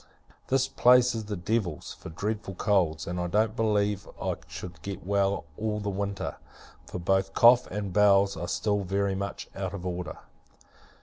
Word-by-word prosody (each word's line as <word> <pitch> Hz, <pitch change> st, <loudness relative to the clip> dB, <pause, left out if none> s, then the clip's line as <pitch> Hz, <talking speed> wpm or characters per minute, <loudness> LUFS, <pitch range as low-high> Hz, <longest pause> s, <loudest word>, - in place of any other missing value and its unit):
This 135 Hz, 0 st, +2 dB
place 125 Hz, -1 st, +5 dB
is 110 Hz, -2 st, -4 dB
the 105 Hz, 0 st, -3 dB
devil's, 90 Hz, -2 st, -2 dB
for -, -, -10 dB
dreadful 105 Hz, +3 st, -4 dB
colds: 90 Hz, -7 st, +1 dB
and 90 Hz, +1 st, -3 dB
I 90 Hz, -, -1 dB
don't 105 Hz, +4 st, +1 dB
believe 105 Hz, -3 st, 0 dB
I -, -, -1 dB
should 90 Hz, -4 st, -8 dB
get 100 Hz, 0 st, -6 dB
well 100 Hz, -2 st, +1 dB
all 105 Hz, -1 st, -1 dB
the 100 Hz, -1 st, -2 dB
winter; 100 Hz, 0 st, -3 dB, 0.5 s
for -, -, -5 dB
both 95 Hz, +2 st, 0 dB
cough, 120 Hz, +1 st, +7 dB
and 100 Hz, -3 st, -4 dB
bowels, 100 Hz, 0 st, +5 dB
are 85 Hz, +2 st, -4 dB
still 105 Hz, +4 st, 0 dB
very 100 Hz, +1 st, 0 dB
much 100 Hz, +1 st, -4 dB
out 95 Hz, 0 st, -3 dB
of 95 Hz, -2 st, -7 dB
order. 90 Hz, 0 st, -4 dB
100 Hz, 170 wpm, -28 LUFS, 90-105 Hz, 0.5 s, cough